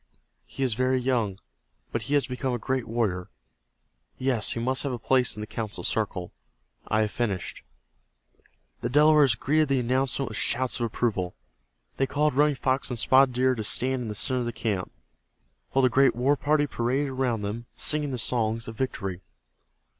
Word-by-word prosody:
He 135 - -4
is 130 -4 +2
very 130 +3 +1
young, 120 -6 0 0.5
but 115 - -1
he 135 +7 -1
has 145 - +3
become 125 +1 -3
a - - -1
great 130 +2 -2
warrior. 105 -6 -1 0.9
Yes, 130 -4 +1
he - - -4
must 130 +3 0
have 140 - -2
a 125 - -3
place 125 0 +2
in - - -5
the - - -4
council 110 -1 -5
circle. 95 -5 -2 0.6
I 110 - +2
have 105 -1 0
finished." 105 -7 -3 1.2
The - - -2
Delawares 150 -2 +5
greeted 155 +6 +1
the 135 -1 +2
announcement 130 +1 0
with 110 - -3
shouts 130 +1 0
of 120 - 0
approval. 105 - -2 0.6
They 135 - +1
called 150 +1 +1
Running 145 +2 +3
Fox 130 +1 -1
and 125 - -3
Spotted 130 +2 +4
Deer 130 +1 +3
to 110 -3 -4
stand 130 +4 +1
in 120 - -4
the 105 - -4
center 130 +4 0
of 120 - -2
the - - -1
camp, 110 -4 -3 0.8
while 135 - +2
the - - +6
great 135 +1 +4
war 130 +4 +2
party 150 +1 +2
paraded 135 +2 -1
around 130 -5 -1
them, 115 +4 -4
singing 150 -1 +1
the 130 - -3
songs 115 -1 -1
of 115 - -7
victory. 95 -7 -3
125 Hz, 185 wpm, -26 LUFS, 110-135 Hz, 1.2 s, the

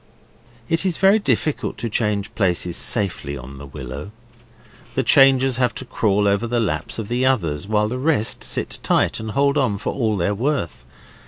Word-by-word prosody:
It 165 +5 +1
is 185 -4 -1
very 195 +3 +5
difficult 155 -7 -1
to 115 - -3
change 105 -2 -1
places 90 -4 0
safely 85 -9 -1
on 65 +2 -10
the 70 - -9
willow. 70 +4 -8 0.9
The - - +1
changers 135 -2 +5
have 125 -3 +1
to 130 - -5
crawl 105 -4 +1
over 100 +3 +1
the 120 +1 0
laps 80 -9 -2
of 110 -3 -4
the 120 +3 -1
others, 90 - 0
while 105 0 +1
the 125 +2 -4
rest 140 -6 +1
sit - - 0
tight - - +1
and 110 0 -6
hold 140 +5 +2
on 110 -7 0
for 105 - -3
all 110 -5 0
they're 95 +3 0
worth. 115 - -2
110 Hz, 180 wpm, -21 LUFS, 90-130 Hz, 0.9 s, very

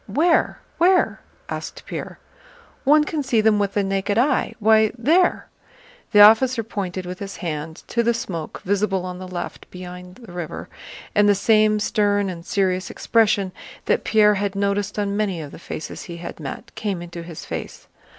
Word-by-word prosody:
"Where? 315 - +2 0.2
Where?" 365 +2 +3 0.3
asked - - -6
Pierre. - - -6 0.7
"One 300 +2 +6
can 300 0 -2
see 255 -4 +1
them 215 -1 +4
with 200 -1 -1
the 205 - +2
naked 195 +1 -1
eye... 260 +5 +2
Why, 220 0 +4
there!" 325 +10 +3 0.7
The 205 - +7
officer 230 +3 +6
pointed 190 -4 -4
with 180 +1 -6
his 200 -1 -6
hand 160 -2 -5
to 235 - +1
the 235 0 +2
smoke 170 -8 -5
visible 195 -1 0
on 180 0 -6
the 185 - -7
left 180 -1 -6
beyond 180 0 -9
the 230 -5 -13
river, 175 -2 -6 0.4
and 205 0 +4
the 205 - +5
same 215 +1 +3
stern 205 -2 +1
and 170 -2 -8
serious 185 0 0
expression 210 -4 +2 0.3
that - - +1
Pierre 210 -1 +4
had 200 -1 -2
noticed 200 0 -1
on 200 -1 -1
many 200 -5 -1
of 150 -3 -7
the - - -11
faces 155 - -7
he 170 -1 -8
had 170 - -8
met 135 -4 -7
came 205 -5 -3
into 170 0 -8
his 165 -1 -9
face. - - -7
200 Hz, 175 wpm, -22 LUFS, 180-220 Hz, 0.7 s, The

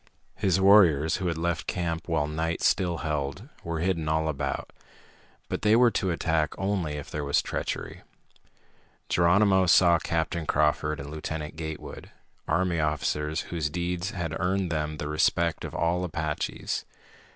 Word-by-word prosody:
His 95 -3 +1
warriors, 90 -6 +5
who 95 - -2
had 85 -2 -1
left 85 0 -2
camp 85 -2 -2
while 75 - +1
night 80 +2 -2
still 90 -2 +2
held, 75 - -3 0.2
were 85 -1 -3
hidden 85 -4 0
all 80 0 +1
about. 70 -2 -3 0.7
But - - -3
they 105 +1 +4
were 120 0 +5
to 95 - -1
attack 80 -2 0
only 95 -6 -1
if 75 -1 -7
there 75 - -3
was 70 0 +2
treachery. - - -4 1.1
Geronimo 95 +2 +4
saw 85 0 +6
Captain 80 0 -2
Crawford 75 0 +1
and 70 +1 -7
Lieutenant 75 0 -5
Gatewood, 80 -1 -7 0.4
army 90 -2 +1
officers 75 +1 -1
whose 80 -3 -1
deeds 90 +3 -2
had 85 -7 -4
earned 95 -1 0
them 75 -1 -2
the 75 - -4
respect 85 +2 +1
of - - -6
all 85 +2 +1
Apaches. 80 -3 -3
80 Hz, 150 wpm, -27 LUFS, 75-90 Hz, 1.1 s, saw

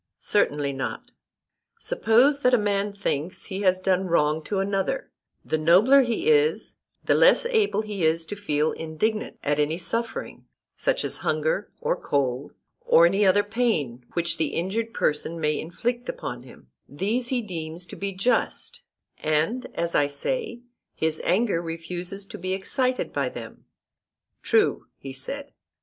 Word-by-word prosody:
Certainly 145 -8 +1
not. 135 0 -5 0.7
Suppose 275 - +3
that 250 -3 +4
a - - +4
man 205 -1 0
thinks 180 -4 -3
he 190 +1 -5
has 185 -2 +3
done 185 0 +2
a - - -4
wrong 155 -3 +1
to 205 - -2
another, 195 - -1 0.3
the 155 - 0
nobler 195 - +6
he 240 - -1
is 455 0 +2 0.3
the - - +4
less - - +5
able 435 - +1
is 165 -6 +1
he - - -18
to 205 - -4
feel 150 -5 +1
indignant 185 +8 -2
at 145 0 0
any 150 +2 +1
suffering, 230 +6 -3 0.3
such - - 0
as - - -3
hunger, - - -1
or 480 +1 0
cold, 135 -1 -2 0.3
or 165 - +6
any 195 +3 +3
other 205 +2 +4
pain 205 - -1
which 170 -1 -1
the 155 - -1
injured 215 +7 -1
person 155 +2 0
may 150 -1 0
inflict 240 +9 -3
upon 120 -1 -5
him—these 145 - -5
he 245 -2 0
deems 170 -3 -6
to - - -10
be 200 0 -3
just, 195 +7 -1 0.4
and, 155 +12 0
as 170 0 -1
I 145 - +3
say, 335 - -3 0.3
his 160 0 -1
anger 195 -3 +2
refuses 175 +4 -5
to - - -10
be 185 0 -2
excited 255 +7 -1
by - - 0
them. - - -10 0.8
True, 440 -2 +2
he 135 -1 -8
said. 280 - -4
190 Hz, 155 wpm, -25 LUFS, 160-235 Hz, 0.8 s, nobler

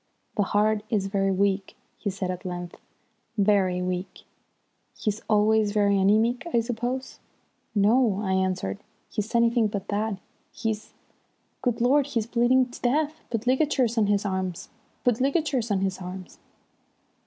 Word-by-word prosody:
"The 210 - +2
heart 210 +1 +2
is 205 -4 +1
very 195 0 0
weak," 195 0 0 0.2
he 205 - -2
said 190 -1 -3
at 180 - -6
length. 175 -1 -5 0.6
"Very 195 -3 +2
weak. 180 +1 -4 0.7
He's 210 +1 -2
always 215 0 +3
very 205 -1 +3
anæmic, 215 +5 +3
I - - +5
suppose?" 245 +3 -4 0.6
"No," 215 0 +3
I 190 -2 0
answered. 185 - -1 0.3
"He's 215 +3 -3
anything 235 -1 +4
but 200 -1 -5
that. 210 0 -1 0.3
He's 220 -2 -4 0.7
Good 240 -2 0
Lord, 270 +3 +4
he's 230 -6 -1
bleeding 245 +2 +3
to - - -11
death! 295 +5 +1 0.2
Put 230 0 -2
ligatures 260 -2 +2
on 220 -3 +3
his 205 0 +1
arms. 190 -3 -3 0.3
Put 245 0 +2
ligatures 275 -4 +1
on 195 -2 +1
his 190 -1 -1
arms." 185 0 -8
210 Hz, 145 wpm, -26 LUFS, 195-240 Hz, 0.7 s, I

